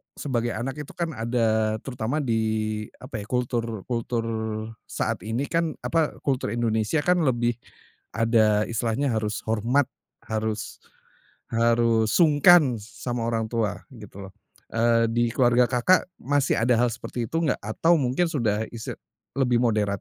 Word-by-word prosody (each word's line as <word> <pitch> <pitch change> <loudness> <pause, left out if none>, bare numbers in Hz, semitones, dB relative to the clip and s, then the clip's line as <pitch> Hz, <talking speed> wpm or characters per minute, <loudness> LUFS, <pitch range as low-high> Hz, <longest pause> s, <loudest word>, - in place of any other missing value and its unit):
sebagai 120 -4 -2
anak 130 +6 -4
itu 150 - -8
kan 170 -2 -2
ada 110 -3 +1
terutama 135 +3 -2
di 115 -3 +1 0.6
apa 130 -4 -6
ya, 100 - -8
kultur 115 -4 -2
kultur 115 -1 -2 0.6
saat - - -2
ini 115 +5 -1
kan 165 -2 0
apa, 165 -2 0
kultur 125 -5 -1
Indonesia 115 +5 0
kan 180 0 +3
lebih 120 -6 +2 0.6
ada 110 -2 +3
istilahnya 120 +4 -1
harus 110 0 -2
hormat, 115 +6 +2 0.4
harus 110 -1 -3 0.7
harus 115 -1 +2
sungkan 150 -4 +5
sama 115 +2 -5
orang 115 -1 -1
tua 115 -3 -1 0.2
gitu 100 -2 -10
loh, - - -22 0.4
eee, 115 0 +2
di 120 +1 +1
keluarga 125 -1 +4
Kakak, 125 +10 +3 0.2
masih 140 -1 +1
ada 120 0 +3
hal 120 +1 +3
seperti 120 0 -5
itu 165 +8 -2
enggak? 155 -5 +1
Atau 165 +10 +3
mungkin 145 +5 +1
isti 160 - -6
sudah 105 -4 +1 0.8
lebih 125 -3 +2
moderat? 110 -4 +2
120 Hz, 140 wpm, -25 LUFS, 110-135 Hz, 0.8 s, sungkan